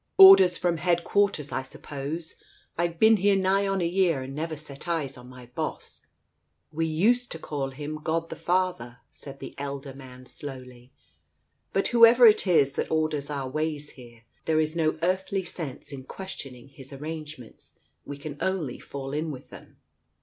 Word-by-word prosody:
Orders 380 - +9
from 175 -2 0
headquarters, 175 -1 +1
I - - -1
suppose? 145 +4 -6 0.4
I've 170 0 -1
been 220 +4 +6
here 200 +1 +3
nigh 195 +1 +2
on 195 -1 0
a - - +1
year 170 -6 +1
and 135 +1 -7
never 155 +2 -4
set 140 +1 -10
eyes 155 -6 -2
on 125 0 -13
my 125 -1 -12
boss! 120 0 -6 0.3
" - - -49 0.3
"We 160 +1 -1
used 225 +11 +2
to - - -6
call 145 -4 -4
him 150 +3 -6
God 165 +1 -1
the - - -4
Father," 175 -10 -1
said 140 -1 -10
the - - -8
elder 140 -1 -5
man 130 -1 -12
slowly.... 125 -2 -9 0.8
"But 195 - +1
whoever 235 +1 +7
it 215 -2 +6
is 145 -6 +4
that - - -3
orders 155 -2 -1
our 140 -3 -3
ways 150 +1 -3
here, 120 -3 -15 0.2
there 160 -1 +2
is 155 +1 0
no 160 -1 +1
earthly 190 +2 0
sense 155 -5 -6
in 135 -2 -8
questioning 135 -10 -9
His 135 -1 -12
arrangements, 150 -3 -8 0.3
we 145 - -7
can 145 0 -8
only 175 -10 -2
fall 135 0 -7
in 155 +2 -2
with 130 -4 -9
them. - - -14
155 Hz, 170 wpm, -26 LUFS, 135-180 Hz, 0.8 s, Orders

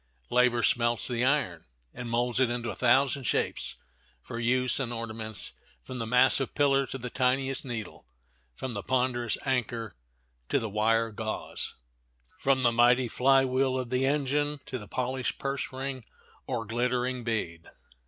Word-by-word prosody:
Labor 125 -1 +3
smelts 120 +2 +2
the 120 -1 0
iron, 130 - +1 0.3
and 125 -1 -6
molds 120 +1 0
it 130 -2 +4
into 120 -1 -2
a - - -7
thousand 135 +3 +3
shapes - - -1 0.5
for 115 - -6
use 125 +2 +2
and 125 -3 -1
ornaments, 110 -2 -5 0.3
from 130 - -7
the 115 - -3
massive 130 +2 +4
pillar 140 -1 +3
to 135 - -5
the 125 -1 -6
tiniest 130 +1 +1
needle, 115 -6 -6 0.5
from 130 - -4
the 100 - -3
ponderous 125 0 0
anchor 120 -4 -1 0.6
to - - +3
the 110 -2 -3
wire 115 +2 +2
gauze, 110 0 -4 0.6
from 135 -1 +2
the 120 - +5
mighty 120 +2 +4
flywheel 130 +1 +3
of 125 -1 -5
the 130 +1 +2
engine 145 +1 +1
to 130 - -4
the 105 - -10
polished 130 +2 -2
purse 140 0 -3
ring 130 -1 -5 0.4
or 120 -3 -2
glittering 125 +2 -1
bead. 100 -8 -3
125 Hz, 155 wpm, -28 LUFS, 115-130 Hz, 0.6 s, the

